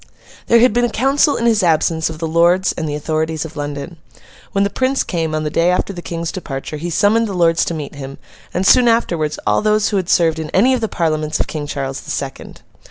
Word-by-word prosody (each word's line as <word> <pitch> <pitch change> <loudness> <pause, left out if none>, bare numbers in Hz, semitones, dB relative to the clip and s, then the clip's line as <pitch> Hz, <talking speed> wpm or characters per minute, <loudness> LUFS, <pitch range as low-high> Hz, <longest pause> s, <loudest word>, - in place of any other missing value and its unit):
There 235 0 +5
had 250 -2 +4
been 240 +1 +2
a 240 - +2
council 275 +5 +2
in 235 - -2
his 225 -2 +3
absence, 160 -1 +1
of 160 - -7
the 165 - -3
lords, 170 +3 +3
and 160 -2 -4
the 145 - -3
authorities 155 +1 -2
of 160 - -10
London. 145 +3 -5 0.5
When 200 - +1
the 200 - -1
Prince 260 +1 0
came, 160 -3 -2
on 155 - -1
the 150 - -3
day 170 +2 +2
after 180 +2 0
the 175 - -7
King's 170 -1 -4
departure, 150 -4 -6
he 170 +4 -4
summoned 215 +6 +2
the 200 - -5
Lords 165 -1 +3
to 170 - -3
meet 150 -2 -6
him, 135 -1 -8 0.3
and 185 - -1
soon 245 +4 +6
afterwards, 170 -10 +1
all - - +2
those 215 0 +2
who 205 - 0
had 185 -2 -2
served 165 -2 +3
in 155 -1 -5
any 245 +7 +4
of 255 - -1
the 220 - 0
Parliaments 155 -4 -1
of - - 0
King 150 -2 -5
Charles 135 -2 -4
the - - -13
Second. 135 -1 -6
170 Hz, 240 wpm, -18 LUFS, 155-205 Hz, 0.5 s, soon